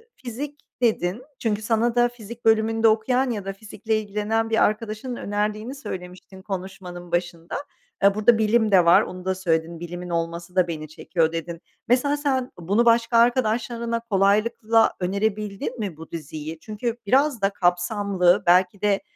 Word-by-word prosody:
fizik 285 +4 -7 0.2
dedin, 220 -1 0 0.2
çünkü 215 -2 -1
sana 230 +2 +1
da 240 0 +4
fizik 235 0 -11
bölümünde 225 0 +3
okuyan 250 +4 +2
ya 205 -4 -4
da 195 - -3
fizikle 215 +2 -3
ilgilenen 215 +2 -1
bir 225 - +3
arkadaşının 215 +3 -2
önerdiğini 210 +4 -3
söylemiştin 185 -6 -9
konuşmanın 180 -2 -7
başında. 175 -1 -3 0.5
E, 200 0 +5
burada 220 +2 +4
bilim 220 0 +2
de 180 -3 +6
var, 170 - +7
onu 180 0 -7
da 190 0 0
söyledin, 165 -2 -1
bilimin 175 +1 -7
olması 170 +1 -3
da 185 -2 +3
beni 155 -2 -5
çekiyor 160 +1 -1
dedin. 165 +1 -5 0.3
Mesela 270 +4 +2
sen 265 -3 -1
bunu 200 +8 +1
başka 230 0 +4
arkadaşlarına 235 -1 +1
kolaylıkla 220 +1 +2
önerebildin 200 +4 -2
mi 195 -8 -4
bu 160 - -11
diziyi? 155 0 -6
Çünkü 225 +4 -4
biraz 265 +2 +2
da 195 - +3
kapsamlı, 185 0 +2
belki 185 +2 +4
de, 205 -1 +2
210 Hz, 150 wpm, -24 LUFS, 180-230 Hz, 0.5 s, var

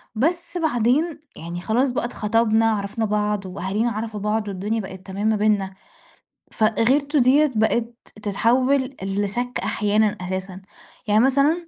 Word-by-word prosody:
بس 340 +7 -1
بعدين 300 +2 +1 0.2
يعني 170 +2 -6
خلاص 245 +7 +1
بقى 245 - -2
اتخطبنا، 225 0 +1
عرَفنا 205 +2 -2
بعض، 210 -1 -1
وأهالينا 195 +5 -2
عرَفوا 215 0 -4
بعض، 210 +1 -1
والدنيا 205 +4 -2
بقِت 190 -1 -10
تمام 200 +2 -3
ما 220 - +3
بيننا. 205 -2 +1 0.8
فغِيرته 265 +7 +2
دِيَّة 275 +4 +4
بقت 230 +2 +1 0.3
تتحوَّل 255 +6 +1
لشَك 205 +6 -2
أحيانًا، 210 0 +1
أساسًا 185 +1 -5 0.5
يعني 215 +3 +4
مثلًا، 290 +6 +2
220 Hz, 130 wpm, -22 LUFS, 205-255 Hz, 0.8 s, دِيَّة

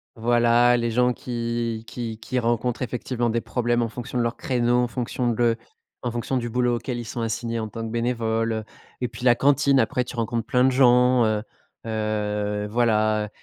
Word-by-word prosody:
Voilà 120 +1 +4
les 120 0 0
gens, 125 +2 +2
qui 115 -2 -3
qui 115 -2 -5
qui 125 +2 -2
rencontrent 120 +1 -1
effectivement 120 0 -2
des 115 +1 0
problèmes 120 -1 0
en 115 - -2
fonction 125 +2 -6
de 120 - +2
leurs 115 0 -1
créneaux, 120 -1 +1
en 125 0 +2
fonction 125 0 -2
de 115 0 +2 0.4
en 120 - -2
fonction 120 +2 -2
du 120 -1 -2
boulot 125 0 +1
auquel 120 +1 -4
ils 120 - -5
sont 115 +1 -5
assignés 115 +1 -2
en 110 - -3
tant 115 +2 -6
que 110 - -5
bénévole, 115 -2 -1 0.4
et 125 - +1
puis, 120 +1 -8
la 120 -1 +6
cantine 140 0 +3
après, 125 +2 +1
tu 125 - -9
rencontres 115 0 -2
plein 125 0 +2
de 130 - +5
gens, 125 -1 +5
heu, 110 -1 0 0.4
heu, 105 -1 -2
voilà 110 -2 +1
120 Hz, 190 wpm, -24 LUFS, 115-125 Hz, 0.4 s, la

